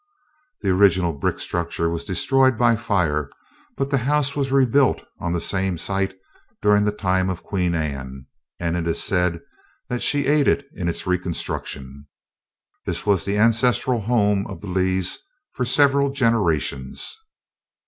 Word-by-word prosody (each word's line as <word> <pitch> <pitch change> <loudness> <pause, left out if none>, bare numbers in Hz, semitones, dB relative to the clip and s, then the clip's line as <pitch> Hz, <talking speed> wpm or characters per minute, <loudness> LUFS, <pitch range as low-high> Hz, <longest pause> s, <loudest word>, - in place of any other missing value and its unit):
The 95 - +2
original 90 -3 +3
brick 70 - -2
structure 85 -1 -2
was 85 0 -3
destroyed 130 +6 +2
by 120 -1 +4
fire, 85 -10 0 0.5
but 135 0 -2
the 140 - +3
house 140 +2 0
was 135 -2 -1
rebuilt 135 0 +3 0.2
on 85 - -2
the 85 - 0
same 95 0 -1
site 95 +2 -2 0.4
during 105 0 +3
the 105 - +2
time 95 -2 0
of 90 -2 -4
Queen 90 -3 -1
Anne, 65 -4 -4 0.3
and 85 -1 -1
it 85 -1 -2
is 85 - 0
said 90 -3 0 0.5
that 125 -1 -2
she 145 -1 +2
aided 145 0 +3
in 85 -2 -2
its 85 - -4
reconstruction. 75 -6 -4 0.8
This - - -3
was 100 -4 +2
the 100 +1 -1
ancestral 115 +2 +2
home 105 -3 +1
of - - -8
the 100 - -7
Lees 95 0 0 0.3
for 125 - -2
several 140 +2 +3
generations. 100 - 0
95 Hz, 150 wpm, -22 LUFS, 85-125 Hz, 0.8 s, by